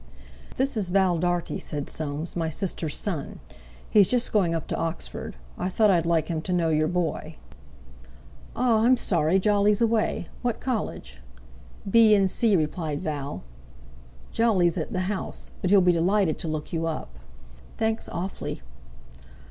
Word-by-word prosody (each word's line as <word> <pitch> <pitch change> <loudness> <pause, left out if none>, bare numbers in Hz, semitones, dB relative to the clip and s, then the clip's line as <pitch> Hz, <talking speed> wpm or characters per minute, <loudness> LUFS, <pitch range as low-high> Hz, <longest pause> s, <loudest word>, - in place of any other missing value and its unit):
"This 265 -2 0
is 195 -4 0
Val 185 -2 +2
Dartie," 175 0 -1
said 145 -2 -5
Soames, 155 +1 -4
"my 165 -2 -1
sister's 160 -2 -3
son. 175 -9 -4 0.5
He's 205 -3 +5
just 245 -1 0
going 180 -6 +2
up 165 - -3
to - - -1
Oxford. 165 - -4 0.2
I 180 - -1
thought 210 +2 +3
I'd 170 -3 +2
like 165 -2 +2
him 160 -2 -2
to 185 - -5
know 170 -2 +2
your 155 0 +2
boy." 175 -2 -2 1.2
"Ah! 235 -3 +3
I'm 250 +2 +5
sorry 170 -4 +2
Jolly's 205 +1 +3
away. 225 -6 +1
What 240 -2 -1
college?" 250 -5 -4 0.7
"B.N.C.," 210 0 +4
replied 155 -2 -1
Val. 145 - -4 0.9
"Jolly's 190 -7 +2
at - - -4
the 185 -4 -1
'House,' 190 +1 -4
but 185 - 0
he'll 200 0 +6
be 180 0 +5
delighted 175 0 +1
to - - -4
look 155 0 -4
you 165 0 -1
up." 65 - -5 0.6
"Thanks 220 0 -1
awfully." 185 +3 -5
180 Hz, 150 wpm, -26 LUFS, 160-210 Hz, 1.2 s, he'll